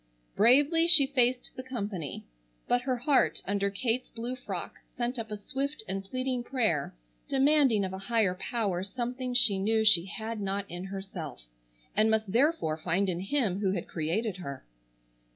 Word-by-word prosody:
Bravely 290 +9 +5
she 320 -5 +7
faced 255 -2 +1
the 255 - -5
company, 205 - -5 0.4
but 245 - +3
her 255 0 0
heart 260 +3 +2
under 200 0 0
Kate's 230 +4 -2
blue 240 +2 -5
frock 255 - -6 0.2
sent 245 +1 -2
up 225 - -5
a 210 - -4
swift 270 +5 -4
and 195 +1 -3
pleading 255 +4 -2
prayer 220 - 0 0.3
demanding 270 -6 +4
of 190 - -5
a 190 - -5
higher 215 -2 +1
Power 190 -2 -2
something 245 +4 -4
she 215 -5 +4
knew 220 +2 +2
she 185 -6 +5
had 220 +2 -5
not 200 0 -2
in 175 0 -6
herself, 190 - -7 0.5
and 215 +1 +4
must 220 -2 +1
therefore 240 - +2
find 180 +4 0
in 175 -1 -2
Him 200 -2 0
who 195 -2 +1
had 180 - -3
created 185 +6 -2
her. 140 -7 -7
220 Hz, 165 wpm, -29 LUFS, 195-255 Hz, 0.5 s, she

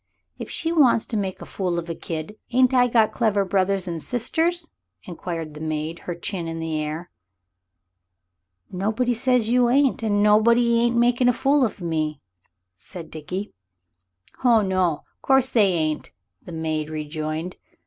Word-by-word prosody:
"If - - -6
she 330 - -2
wants 270 -9 +4
to 230 - -5
make 195 -3 -3
a - - -9
fool 180 -3 -2
of 170 0 -4
a 165 - -3
kid, 160 +4 -6 0.2
ain't 255 +1 +4
I 250 -1 +5
got 225 -3 +3
clever 205 -4 +1
brothers 190 0 +1
and 170 -2 -4
sisters?" 325 - -1 0.3
inquired 165 -3 -6
the 150 - -10
maid, 155 +1 -3
her 175 - -2
chin 175 0 -4
in 165 0 -5
the 160 -1 -3
air. 155 +3 -5 1.6
"Nobody 220 +6 0
says 245 -1 +1
you 245 0 +3
ain't, 270 0 +2
and 205 -2 +1
nobody 235 +3 +4
ain't 235 0 +2
makin' 245 +1 +3
a - - +3
fool 275 +3 +2
of 215 -5 -2
me," 155 -3 -2 0.6
said 165 - -8
Dickie. 180 +6 -6 0.9
"Ho 235 -4 +4
no. 185 -5 0 0.2
Course 265 -1 +3
they 210 -6 +4
ain't," 155 -2 -2 0.3
the - - -11
maid 155 -2 -2
rejoined. 155 +2 -4
195 Hz, 160 wpm, -23 LUFS, 165-240 Hz, 1.6 s, I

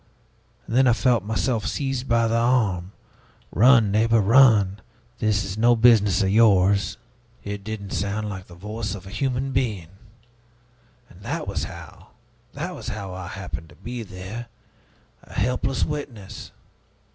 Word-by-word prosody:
And 115 - -4
then 130 +1 +5
I 120 - +5
felt 115 0 +2
myself 110 +2 -1
seized 135 -2 -3
by 115 0 +3
the 115 - -1
arm: 110 -7 +1 0.6
'Run, 115 - +5
neighbor, 115 +2 +3
run! 105 -3 +5 0.4
This 105 -2 +1
is 100 +2 -5
no 120 +1 +5
business 110 -5 +4
of 95 - +1
yours!' 100 -2 +3 0.5
It 100 -1 -6
didn't 105 -2 -6
sound 105 +2 -2
like 95 -3 -7
the 85 - -13
voice 105 +2 -5
of 95 -2 -10
a 95 - -10
human 130 +3 -2
being. 110 -11 -2 1.2
And - - -18
that - - -4
was - - -2
how - - -12 0.4
that - - -5
was - - -9
how 100 -3 -5
I 95 -1 -7
happened 90 -3 -7
to - - -17
be 120 0 -7
there, 100 +4 -8 0.7
a - - -16
helpless 125 +4 0
witness. 135 -10 -7
110 Hz, 150 wpm, -23 LUFS, 100-120 Hz, 1.2 s, then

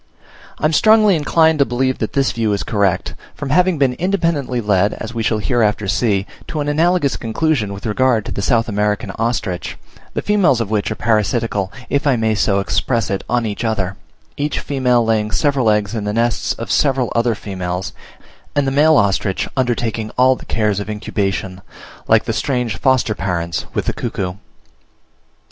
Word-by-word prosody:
I - - -2
am 155 - +2
strongly 215 +1 +5
inclined 160 0 +3
to 140 - +5
believe 130 +1 -1
that 110 - -3
this 135 -2 +2
view 110 -2 0
is 100 - -2
correct, 100 -4 0 0.2
from 140 -2 -5
having 180 +2 +3
been 135 -3 +2
independently 165 -7 -1
led 105 -2 +1
(as 110 +2 -7
we 115 - -2
shall 110 0 +1
hereafter 105 -2 0
see) 100 -1 +1 0.2
to 155 - -4
an 145 - -2
analogous 160 0 +2
conclusion 115 -2 -1
with 100 +2 -8
regard 115 0 +1
to - - -6
the - - -3
South 115 +2 +2
American 105 0 -1
ostrich, 110 -6 -2 0.4
the - - -2
females 200 - +3
of 110 -3 -3
which 105 -2 0
are 110 - -3
parasitical, 110 -2 0 0.2
if 140 +1 0
I 135 - +4
may 110 -1 +1
so 100 -1 +1
express 100 +6 0
it, 100 - -2
on 120 -1 +1
each 105 +1 -4
other; 100 -4 -1 0.4
each 145 +1 -1
female 125 -4 +1
laying 110 -1 +1
several 135 -1 +1
eggs 105 0 +1
in 110 -3 -3
the 105 - -2
nests 115 +1 0
of 115 -4 -6
several 135 +1 +1
other 115 -1 +2
females, 90 -3 -4 0.6
and 145 -1 +2
the 135 - 0
male 150 +2 +5
ostrich 100 -1 +1
undertaking 115 -4 -1
all 130 +1 +5
the - - -13
cares 105 -3 0
of 100 - -5
incubation, 100 -3 -3 0.5
like - - +4
the - - -2
strange 125 -6 -1
foster 130 -1 +2
parents 85 -4 -3
with - - -1
the - - -1
cuckoo. 90 -2 -3
115 Hz, 180 wpm, -18 LUFS, 105-135 Hz, 0.6 s, strongly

